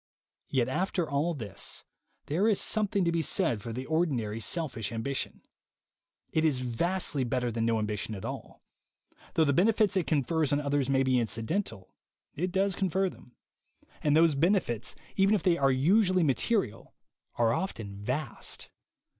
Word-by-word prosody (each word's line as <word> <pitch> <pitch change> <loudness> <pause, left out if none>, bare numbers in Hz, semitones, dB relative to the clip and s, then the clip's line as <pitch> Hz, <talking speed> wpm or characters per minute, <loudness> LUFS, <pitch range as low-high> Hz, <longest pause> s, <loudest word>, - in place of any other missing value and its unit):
Yet 125 -3 +1
after 175 +4 -1
all 150 +4 0
this, 110 -7 -3 0.4
there 180 +9 +1
is 215 -3 +3
something 205 -3 +1
to 170 - +2
be 170 -1 +1
said 160 - +1
for 115 - -6
the 130 +3 -5
ordinary 135 -10 0
selfish 115 - -2
ambition. 130 +4 -3 0.9
It 160 - +1
is 145 -5 +2
vastly 145 +4 0
better 125 0 -1
than 115 0 -1
no 115 -1 +2
ambition 105 0 -3
at 95 - -7
all. - - -7 0.7
Though 160 - +5
the 140 -2 +2
benefits 210 +4 +3
it 185 -4 +1
confers 155 0 +1
on 145 - +2
others 140 -2 0
may 135 -1 +3
be 130 -1 +3
incidental, 115 - -3 0.4
it 180 +4 -2
does 195 0 +1
confer 190 0 0
them; 120 - -17 0.7
and 150 0 +3
those 165 -1 +5
benefits, 150 - +1 0.2
even 195 +2 +4
if 195 - -1
they 180 -3 +4
are 140 -4 +3
usually 185 +7 +3
material, 155 - 0 0.4
are 115 -1 +2
often 110 - -4
vast. 125 +6 -4
145 Hz, 155 wpm, -29 LUFS, 120-180 Hz, 0.9 s, Though